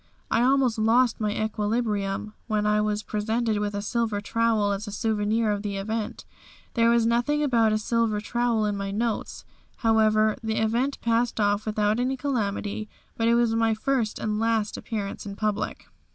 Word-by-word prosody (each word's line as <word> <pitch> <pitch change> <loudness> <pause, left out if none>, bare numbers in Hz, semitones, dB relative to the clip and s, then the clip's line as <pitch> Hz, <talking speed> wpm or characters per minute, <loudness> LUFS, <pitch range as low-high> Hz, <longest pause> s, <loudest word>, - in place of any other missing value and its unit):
I 230 - +3
almost 255 -3 +3
lost 230 +2 +3
my 210 - +1
equilibrium 210 -1 -1
when 215 -2 0
I 210 0 +3
was 210 0 -1
presented 220 +1 -1
with 205 0 -2
a 205 - -3
silver 220 -1 -1
trowel 220 -1 +1
as 200 +2 -3
a - - -5
souvenir 215 +1 0
of 205 -1 -1
the 200 -1 -3
event. 220 +2 -4 0.5
There 230 -1 +3
was 235 -1 +3
nothing 240 +6 +1
about 230 -6 +3
a 215 - +2
silver 220 -1 0
trowel 235 0 0
in 205 -1 0
my 200 0 -3
notes. 220 +2 -3 0.3
However, 215 -1 +3
the 220 -1 -2
event 235 +6 0
passed 230 0 +1
off 205 +1 +1
without 210 +1 +1
any 260 +2 0
calamity 215 -5 -2 0.3
but 225 - 0
it 235 - +4
was 235 -1 +2
my 225 -1 +2
first 235 -1 -1
and 215 -1 -2
last 225 -2 0
appearance 210 -2 -5
in 200 - -6
public. 210 0 -2
220 Hz, 175 wpm, -26 LUFS, 210-230 Hz, 0.5 s, it